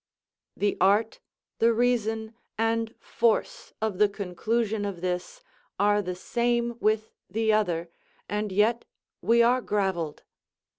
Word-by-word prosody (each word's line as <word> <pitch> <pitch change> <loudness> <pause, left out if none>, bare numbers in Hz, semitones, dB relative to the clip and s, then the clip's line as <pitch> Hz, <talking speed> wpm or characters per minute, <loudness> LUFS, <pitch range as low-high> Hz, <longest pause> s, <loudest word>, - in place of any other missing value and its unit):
The 205 0 0
art, 205 +4 +3 0.4
the 230 +1 +5
reason, 225 -2 0 0.2
and 225 +1 0
force 230 -1 0
of 210 -4 -1
the 210 -1 +5
conclusion 210 +3 -1
of 195 -4 -4
this, 185 - -3 0.4
are 205 0 +3
the 180 -2 -4
same 235 +4 0
with 215 0 +1 0.2
the 220 0 +1
other, 175 -6 +1 0.4
and 210 +1 -2
yet 220 +5 +2 0.4
we 235 +1 +4
are 250 +2 +3
gravelled. 190 -9 -1
215 Hz, 120 wpm, -27 LUFS, 200-230 Hz, 0.4 s, the